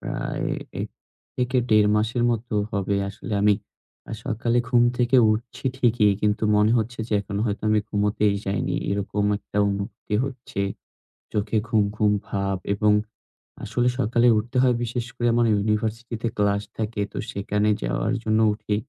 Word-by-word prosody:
প্রায় - - -3 0.3
১ - - -3 0.5
থেকে 125 +1 0
১.৫ 105 -1 +5
মাসের 115 +3 0
মতো 115 0 -2 0.2
হবে। 100 -1 0
আসলে 105 +3 -8
আমি 105 0 +5 0.6
আ - - -5
সকালে 120 +2 0
ঘুম 120 -1 +4 0.2
থেকে 125 +2 +3 0.2
উঠছি 115 +5 -6
ঠিকই। 115 -5 +3
কিন্তু 105 +1 +1
মনে 105 +2 +4
হচ্ছে 115 +2 -3
যে, - - -4
এখনো 100 0 -4
হয়তো 105 0 -3
আমি 105 -1 +3
ঘুমুতেই 105 0 +1
যাইনি। 95 - -1 0.2
এরকম 100 +1 -1
একটা 105 - -10
অনুভূতি 100 +2 -4
হচ্ছে। 125 -7 -6 0.7
চোখে 105 +1 0
ঘুম, 110 -3 +3
ঘুম 105 -1 +3 0.2
ভাব। 100 -1 -1 0.2
এবং 105 +1 +3 0.7
আসলে 120 +3 0
সকালে 120 +1 +3
উঠতে 120 +4 -2
হয় 125 -2 +4
বিশেষ 120 0 -3
করে 120 -1 0
আমার 120 0 +3
ইউনিভার্সিটিতে 110 +3 -1
ক্লাস 100 0 +2 0.2
থাকে। 110 -1 -2
তো - - -8
সেখানে 105 +1 0
যাওয়ার - - -1
জন্য 110 0 +2
উঠি। 105 -1 -3
110 Hz, 155 wpm, -24 LUFS, 105-120 Hz, 0.7 s, ১.৫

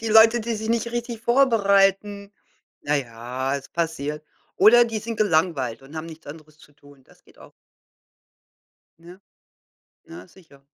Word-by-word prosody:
Die 225 - -4
Leute, 225 +2 +6
die 230 +1 -3
sich 220 0 -5
nicht 235 0 -1
richtig 240 -1 -5
vorbereiten. 200 -5 +2 0.5
Na 150 +1 0
ja, 125 +2 -4
es 135 - -10
passiert. 150 -3 -4 0.3
Oder 235 +4 +6
die 225 -2 -4
sind 230 +1 -6
gelangweilt 160 - 0
und 140 +4 -13
haben 155 +1 -5
nichts 160 -1 -13
anderes 155 0 -13
zu 150 - -20
tun. 145 -1 -20
Das - - -24
geht - - -24
auch. - - -16 1.5
Ja. 175 +3 -15 0.9
Ja, 90 +3 -11
sicher. 140 -7 -21
175 Hz, 150 wpm, -23 LUFS, 145-220 Hz, 1.5 s, Leute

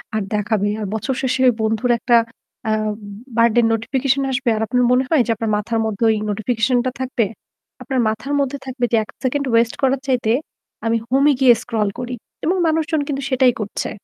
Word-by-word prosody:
আর 215 - +1
দেখাবে। 210 0 0
আর 210 - -3
বছর 260 +5 -2
শেষে 260 0 0
ওই 245 - +5
বন্ধুর 220 +3 +1
একটা 240 0 +4 0.5
আ - - +2 0.7
বার্থডে 235 +1 +4
নোটিফিকেশন 265 +4 0
আসবে। 255 -2 0
আর 215 - -2
আপনার 250 +2 +2
মনে 255 +1 +4
হয় 310 -6 +4
যে - - +1
আপনার 220 0 -2
মাথার 225 +2 -2
মধ্যে 220 +1 -2
ওই - - +1
নোটিফিকেশন 225 +4 0
টা 255 - 0
থাকবে। 255 -3 0 0.6
আপনার 265 -3 -2
মাথার 220 +7 -2
মধ্যে 280 0 -1
থাকবে 255 -2 -2
যে 230 - +4
১ - - -16
সেকেন্ড 280 +2 0
ওয়েস্ট 230 0 +3
করার 270 0 +2
চাইতে 245 -4 +1 0.5
আমি 230 0 +2
হোম 270 +2 +3
এ - - +3
গিয়ে 250 -2 +8
স্ক্রল 220 -4 -1
করি। 250 0 -4 0.3
এবং 360 +4 +2
মানুষজন 315 -1 +1
কিন্তু 280 -1 -2
সেটাই 255 -2 +4
করছে। 205 - -4
245 Hz, 190 wpm, -20 LUFS, 225-265 Hz, 0.7 s, গিয়ে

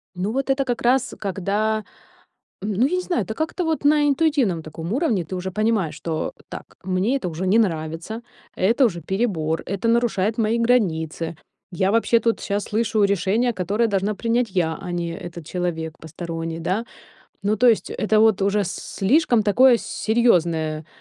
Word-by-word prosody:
Ну, 190 +4 -2
вот 270 +2 -2
это 270 0 +2
как 245 -2 -2
раз, 250 +1 +2
когда 205 +3 -1 0.8
н 210 - -2
ну, 215 +6 +2
я 360 - -1
не 365 - 0
знаю, 350 - -1
это 220 - -5
как-то 320 +7 -2
вот 320 -2 -1
на 295 0 +4
интуитивном 275 - +1
таком 160 +3 -7
уровне 240 - +1
ты 185 - -6
уже 185 +1 -4
понимаешь, 215 -4 0
что: 160 -1 -3 0.2
"Так, - - -10
мне 190 +7 0
это 195 - -4
уже 170 +4 -3
не 200 +4 +4
нравится, 165 +2 -2 0.3
это 230 +8 +3
уже 175 -6 -1
перебор, 165 -4 -1
это 200 +5 -2
нарушает 230 -3 +1
мои 225 +1 +1
границы, 165 -9 0 0.4
я 190 +2 +1
вообще 230 +1 +3
тут 230 0 0
щас 200 -1 -2
слышу 215 -1 +1
решение, 200 +5 +2
которое 205 +5 0
должна 200 +1 0
принять 235 +1 0
я, 170 -4 0
а 180 - -6
не 175 -1 -2
этот 170 -1 -8
человек 160 -2 -3
посторонний", 165 0 -5
да. 190 +7 -1 0.6
Ну, 210 +2 +1
то 245 +3 +5
есть 225 - +2
это 215 0 +1
вот 220 -3 +4
уже 200 +1 +2
слишком 220 - +1
такое 245 +5 +5
серьёзное, 170 -11 +1
205 Hz, 170 wpm, -22 LUFS, 175-235 Hz, 0.8 s, то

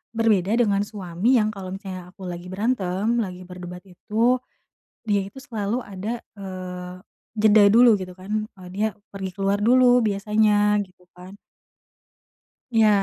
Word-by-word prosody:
berbeda 210 -4 +2
dengan 210 -5 +2
suami 205 +2 0
yang 215 0 +1
kalau 195 -3 -8
misalnya 185 -3 -8
aku 190 - -13
lagi 175 0 -6
berantem, 205 +1 0
lagi 185 -3 -5
berdebat 180 0 -9
itu, 225 +7 +1 0.7
dia 205 -2 +2
itu 200 - -12
selalu 230 -3 -3
ada, 205 +4 -5 0.2
eee, 180 -2 -7 0.4
jeda 215 0 +6
dulu 235 +1 +7
gitu 185 -1 -7
kan, 210 +3 -3
eee, 185 -1 -11
dia 210 +3 +1 0.3
pergi 190 -1 -5
keluar 195 0 +1
dulu 245 +2 +5
biasanya 210 0 +2
gitu 180 -1 -25
kan. 185 +3 -12 1.4
Iya, 220 -1 +5
200 Hz, 140 wpm, -23 LUFS, 185-220 Hz, 1.4 s, dulu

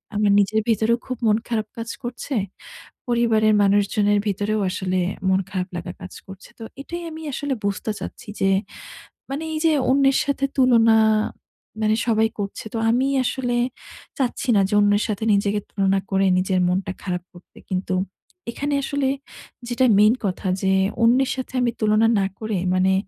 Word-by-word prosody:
আমার 205 -1 +3
নিজের 215 +2 +2
ভেতরেও 225 +1 +2
খুব 255 -1 -4
মন 210 0 +4
খারাপ 220 -2 -1
কাজ 230 0 -5
করছে। 245 +3 -5 0.7
পরিবারের 225 -3 +3
মানুষজনের 205 +1 +2
ভিতরেও 205 +2 -1
আসলে 185 0 -2 0.3
মন 190 0 +3
খারাপ 185 -1 -3
লাগা 175 +1 -5
কাজ 185 - -8
করছে। 195 +2 -12
তো 225 - -8 0.2
এটাই 345 +4 -6
আমি 320 0 -8
আসলে 285 +1 -2
বুঝতে 200 +2 -2
চাচ্ছি - - -8
যে 195 - +3 0.8
মানি 280 +4 -4
এই - - -1
যে 320 - +5 0.2
অন্যের 270 0 +4
সাথে 280 -1 0
তুলনা 230 -4 +5 0.8
মানে 215 0 +2
সবাই 220 -1 +3
করছে। 200 +2 -5
তো 230 - -2
আমি 255 +3 +2 0.2
আসলে 245 -1 -1 0.6
চাচ্ছি 265 +1 -1
না 200 - +5
যে - - -3
অন্যের 205 0 +3
সাথে 215 -1 -3
নিজেকে 200 +1 +1
তুলনা 195 -1 +1
করে 195 0 +2
নিজের 185 0 +1
মনটা 185 +1 -1
খারাপ 180 -2 -3
করতে। 175 0 -18
কিন্তু 185 0 -1 0.6
এখানে 285 +4 -3
আসলে 280 -1 -1 0.6
যেটা 250 +2 +2
মেইন 210 +2 +6
কথা 190 0 -2
যে 190 - +2 0.3
অন্যের 250 +3 +4
সাথে 260 -1 -6
আমি 240 - +2
তুলনা, 215 +1 +3
না 195 - +1
করে, 215 -2 -2 0.2
মানে 185 +1 +3
215 Hz, 160 wpm, -22 LUFS, 195-245 Hz, 0.8 s, মেইন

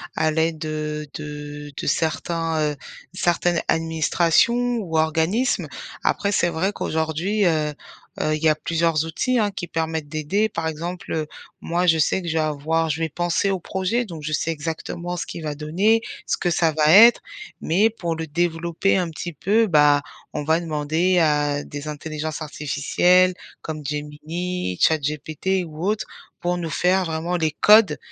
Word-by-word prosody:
à 160 - +2
l'aide 160 0 0
heu, 150 0 -4
de 145 -1 -7
de - - -5
certains, 165 +1 0
heu, - - -10 0.4
certaines 175 -1 +1
administrations 170 +9 +2
ou 180 -8 -4
organismes. 160 +10 +1 0.4
Après 200 - +1
c'est 175 -3 +2
vrai 170 +4 0
qu'aujourd'hui, 165 +5 -1
heu 155 -3 +1 0.5
heu, 155 - +1
il 155 - -6
y 160 - +5
a 155 - +3
plusieurs 165 0 0
outils 245 +10 0
hein, 210 -2 +1
qui 175 -2 -6
permettent 160 -2 -3
d'aider. 160 +8 0
Par 165 -5 -3
exemple, 170 +3 -5
heu, 155 -1 -2 0.3
moi 175 +2 0
je 165 -2 +5
sais 160 +4 +2
que 175 - -7
je 160 - -1
vais 160 - +1
avoir 155 +2 0
je 150 - -3
vais 165 - +1
penser 175 +5 0
au 190 - -1
projet. 190 +8 -1
Donc 165 -7 -8
je 155 +1 -4
sais 160 +2 0
exactement 165 +3 -4
ce - - -3
qui - - -7
va 150 -2 -4
donner, 185 +10 +2 0.3
ce - - +1
que 175 - 0
ça 165 -1 +2
va 155 0 +3
être. 225 +6 +8 0.4
Mais 195 +8 +3
pour 170 -7 -4
le 160 0 -4
développer 170 +3 0
un 180 -2 0
petit 170 +2 -6
peu, 210 +9 +2
bah 150 -6 +4 0.3
on 150 - -3
va 160 +2 +2
demander 160 +3 0
à 145 -2 +1
des 145 +1 -7
intelligences 155 +1 -5
artificielles 175 +5 +2 0.3
comme 155 -2 -6
Gemini, 150 - -4
Chat 160 -1 +4
GPT 155 +6 -2
ou 160 +1 -6
autre, 215 +1 0 0.4
pour 175 0 0
nous 170 -2 -4
faire 185 +4 +2
vraiment 165 +2 -2
les 160 -2 0
codes, 210 0 +5
160 Hz, 175 wpm, -22 LUFS, 155-180 Hz, 0.5 s, être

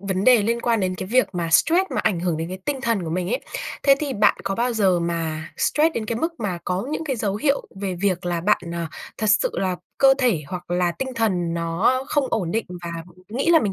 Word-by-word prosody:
vấn 190 0 -2
đề 245 -4 +6
liên 235 +2 0
quan 230 -3 +1
đến 185 -1 0
cái 185 +1 -5
việc 255 +5 +3
mà 170 -2 -2
stress 345 - +4
mà - - +1
ảnh 185 -6 0
hưởng 175 -3 0
đến 165 +1 -3
cái 185 +1 -6
tinh 280 -3 -1
thần 230 -6 +1
của 160 - -4
mình 180 +2 -1
ấy. 250 +4 -1 0.4
Thế 275 - +6
thì 290 -3 -2
bạn 205 -2 +4
có 195 0 -1
bao 240 +3 0
giờ 190 -6 +2
mà 165 -2 -2
stress 320 +2 +2
đến 220 -2 -2
cái 230 - -2
mức 330 +5 -3
mà 185 -5 -2
có 180 +4 -1
những 320 +1 -3
cái 270 -4 -2
dấu 205 -3 -1
hiệu 280 +5 0
về 190 -2 -2
việc 180 -1 -1
là 170 -1 -1
bạn, 200 - +3
à, 170 -1 -3 0.3
thật 215 - -1
sự 210 - +3
là 185 -2 -1 0.2
cơ 270 -1 +6
thể 230 - +2
hoặc 175 +1 -7
là 175 -1 +1
tinh 265 - -2
thần 180 -7 0
nó 170 +10 +1
không 290 -2 +2
ổn 185 -7 0
định 225 - 0 0.2
và 170 - -4 0.4
nghĩ 255 +9 -1
là 330 -2 +6
mình 205 -3 -1
200 Hz, 255 wpm, -23 LUFS, 175-245 Hz, 0.4 s, đề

